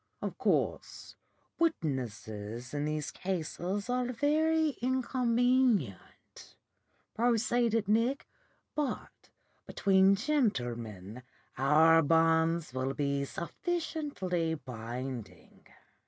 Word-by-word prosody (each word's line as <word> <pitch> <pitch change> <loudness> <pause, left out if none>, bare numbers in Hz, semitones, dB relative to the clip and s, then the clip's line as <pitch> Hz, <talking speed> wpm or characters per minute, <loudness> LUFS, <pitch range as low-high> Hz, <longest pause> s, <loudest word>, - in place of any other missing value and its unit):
'Of - - -4
course - - -1 0.4
witnesses 120 - -3
in 145 0 -1
these 150 -1 -2
cases 185 +2 -3
are 250 0 0
very 310 +4 +2
inconvenient,' 245 - 0 0.6
proceeded 230 -1 +1
Nick, 230 +6 +1 0.5
'but 295 -3 -4 0.4
between 195 0 +4
gentlemen 120 - -2 0.3
our 155 +5 +5
bonds 165 0 +2
will 130 +1 -2
be 140 -1 0
sufficiently 190 - -3
binding. 125 -2 -8
175 Hz, 75 wpm, -31 LUFS, -, 0.6 s, our